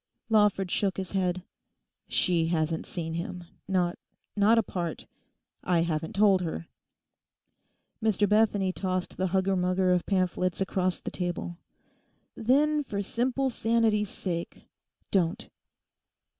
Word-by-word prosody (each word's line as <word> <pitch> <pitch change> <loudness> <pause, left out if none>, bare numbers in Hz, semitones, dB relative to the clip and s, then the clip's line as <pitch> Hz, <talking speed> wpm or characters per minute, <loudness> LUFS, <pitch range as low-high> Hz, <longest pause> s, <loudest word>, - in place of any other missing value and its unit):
Lawford 205 -4 +3
shook 195 -2 0
his 190 -1 -4
head. 185 -2 0 0.6
'She 170 -3 +1
hasn't 160 -1 -1
seen 165 -2 -4
him: 175 +1 -4 0.2
not—not 195 +4 0
apart. 175 -6 -2 0.6
I 175 -2 +2
haven't 160 0 -2
told 195 -2 +5
her.' 165 -1 -4 1.3
Mr 215 -2 +2
Bethany 205 -3 +3
tossed 185 -1 -2
the 185 - 0
hugger 190 +1 +1
mugger 185 0 +2
of 180 -1 0
pamphlets 185 -2 0
across 185 -1 0
the - - -6
table. 175 -1 -4 0.8
'Then, 295 +6 +2
for 200 -6 -3
simple 260 +4 0
sanity's 225 -3 +1
sake, 170 -3 -5 0.5
don't. 180 +1 +1
185 Hz, 115 wpm, -28 LUFS, 175-210 Hz, 1.3 s, told